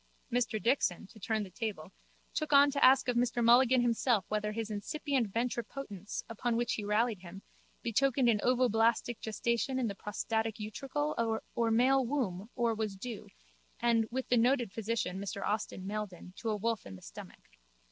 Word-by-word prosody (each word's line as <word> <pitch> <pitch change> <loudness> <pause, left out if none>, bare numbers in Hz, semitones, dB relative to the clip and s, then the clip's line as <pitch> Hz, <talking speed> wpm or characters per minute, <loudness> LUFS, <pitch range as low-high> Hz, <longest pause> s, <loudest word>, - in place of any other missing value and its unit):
Mr 235 -2 0
Dixon, 230 -6 +1
to 215 +3 -16
turn 220 +1 -1
the 190 - -9
table, 195 -4 -5 0.4
took 310 -1 -2
on 285 0 +7
to 280 - 0
ask 260 +1 +6
of 245 - +1
Mr 240 0 +1
Mulligan 245 +2 +6
himself 230 -3 +2
whether 210 0 -1
his 220 0 -4
incipient 260 +1 -1
ventripotence, 230 -3 -4
upon 230 +1 -2
which 240 0 0
he 210 - -3
rallied 210 +1 +1
him, 185 +2 -11 0.4
betokened 255 +2 +2
an 220 -3 +4
ovoblastic 235 -1 +2
gestation 235 +3 -1
in 255 - 0
the 200 - -3
prostatic 220 +2 -2
utricle 230 +1 -2
or 230 -1 +1
male 260 +4 +4
womb 225 -7 -2
or 235 -2 +1
was 215 -2 -3
due, 225 +2 -7 0.5
as 230 -2 +3
with 260 +2 -3
the 245 - +4
noted 240 -2 +2
physician, 215 -4 -2
Mr 200 0 -4
Austin 205 -2 -2
Meldon, 200 -3 -5
to 230 - -3
a 215 - +1
wolf 225 - -2
in 95 - -8
the 90 - -14
stomach. - - -11
230 Hz, 170 wpm, -32 LUFS, 210-245 Hz, 0.5 s, on